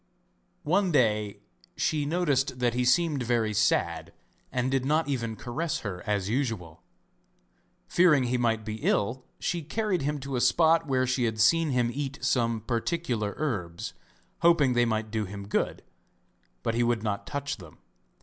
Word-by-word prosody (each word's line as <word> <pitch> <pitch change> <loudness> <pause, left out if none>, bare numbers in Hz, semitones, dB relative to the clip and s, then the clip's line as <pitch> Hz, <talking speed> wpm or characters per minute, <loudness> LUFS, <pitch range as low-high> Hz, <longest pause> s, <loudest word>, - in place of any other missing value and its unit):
One 185 +4 +2
day 105 -7 +1 0.4
she 150 -2 0
noticed 145 -6 +1
that 120 -2 +1
he 125 0 0
seemed 150 +1 +2
very 115 -3 0
sad 105 +1 +1 0.4
and 125 +1 0
did 135 -1 +1
not 155 +4 +1
even 115 -5 -2
caress 140 +8 -3
her 90 -4 -5
as 100 -3 0
usual. 110 - -2 1.1
Fearing 160 -7 +4
he 125 0 0
might 115 -2 0
be 110 0 -4
ill 115 +4 0
she 175 -1 -2
carried 190 +3 -1
him 145 +1 -1
to 140 0 -4
a 125 - 0
spot 165 +1 +4
where 130 -2 +2
she 130 -1 0
had 110 -1 -2
seen 160 +9 +4
him 125 -3 +1
eat 140 -1 -4
some 115 -4 +1
particular 115 -2 -2
herbs, 105 - -3 0.5
hoping 165 -6 +4
they 120 0 +3
might 110 -1 -1
do 110 -1 -1
him 100 +1 -8
good, - - -1 0.8
but 115 - 0
he 120 - +1
would 120 -2 +1
not 100 -2 -2
touch 145 0 -3
them. 85 -6 -13
125 Hz, 160 wpm, -28 LUFS, 110-145 Hz, 1.1 s, Fearing